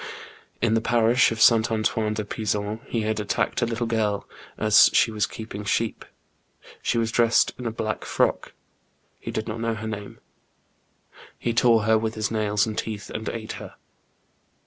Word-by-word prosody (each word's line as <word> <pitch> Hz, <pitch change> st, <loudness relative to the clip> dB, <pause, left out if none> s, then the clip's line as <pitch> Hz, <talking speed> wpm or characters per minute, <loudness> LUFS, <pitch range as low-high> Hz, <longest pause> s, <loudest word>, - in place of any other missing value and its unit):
In 115 Hz, -2 st, +3 dB
the 115 Hz, -, +2 dB
parish 120 Hz, +2 st, +3 dB
of 115 Hz, -, -3 dB
S. 115 Hz, -, +8 dB
Antoine 110 Hz, -1 st, 0 dB
de 105 Hz, -1 st, -3 dB
Pizon 105 Hz, 0 st, -2 dB
he 115 Hz, -, -1 dB
had 110 Hz, 0 st, -1 dB
attacked 105 Hz, +4 st, -1 dB
a 120 Hz, -, +2 dB
little 115 Hz, +1 st, -2 dB
girl, 110 Hz, -3 st, -1 dB, 0.3 s
as 110 Hz, -1 st, +6 dB
she 115 Hz, -, +4 dB
was 105 Hz, -1 st, 0 dB
keeping 110 Hz, -2 st, -7 dB
sheep. 110 Hz, +2 st, -1 dB, 0.8 s
She -, -, 0 dB
was 115 Hz, -1 st, 0 dB
dressed 115 Hz, 0 st, +3 dB
in 125 Hz, -, -4 dB
a -, -, -2 dB
black 110 Hz, -1 st, -3 dB
frock; -, -, 0 dB, 0.7 s
he -, -, -7 dB
did 110 Hz, -, -3 dB
not 115 Hz, 0 st, -4 dB
know 115 Hz, -1 st, -1 dB
her 110 Hz, 0 st, -6 dB
name. 105 Hz, -2 st, -6 dB, 1.2 s
He 120 Hz, -, -2 dB
tore 115 Hz, -1 st, +4 dB
her 110 Hz, 0 st, +3 dB
with 110 Hz, 0 st, -3 dB
his 110 Hz, -1 st, -2 dB
nails 105 Hz, -2 st, +1 dB
and 110 Hz, -1 st, -4 dB
teeth, 105 Hz, -3 st, -5 dB
and 110 Hz, 0 st, -4 dB
ate 110 Hz, -1 st, -5 dB
her. -, -, -10 dB
110 Hz, 175 wpm, -24 LUFS, 105-115 Hz, 1.2 s, S